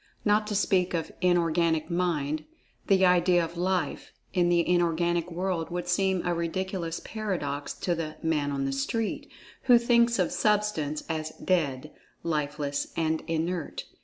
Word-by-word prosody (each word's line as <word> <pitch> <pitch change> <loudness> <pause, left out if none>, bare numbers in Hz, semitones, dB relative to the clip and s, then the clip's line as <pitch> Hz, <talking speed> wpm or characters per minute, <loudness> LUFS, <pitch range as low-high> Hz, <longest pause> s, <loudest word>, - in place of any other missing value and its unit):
Not 210 0 +3
to 210 - -2
speak 185 -3 +2
of 165 - -3
Inorganic 170 -2 +2
"Mind," 160 -4 -1 0.4
the 190 -2 +5
idea 175 -1 +4
of 165 - -10
"Life" 180 +1 -1 0.2
in 175 -2 +3
the 170 -1 +3
Inorganic 175 0 +1
World 175 -1 -2
would 175 0 -4
seem 190 0 +1
a 175 - +1
ridiculous 170 0 -3
paradox 170 -10 -3
to 175 +5 -1
the 160 -2 -4
"man 155 -3 +1
on 135 -1 -1
the 135 - -1
street" 205 +12 -2 0.4
who 245 -2 +7
thinks 235 0 +3
of 180 -3 +1
Substance 210 -9 0
as 155 -1 -2
"dead," 150 -6 -1 0.3
lifeless 145 -2 -2
and 160 -1 +1
inert. 165 0 -2
175 Hz, 145 wpm, -28 LUFS, 160-185 Hz, 0.4 s, who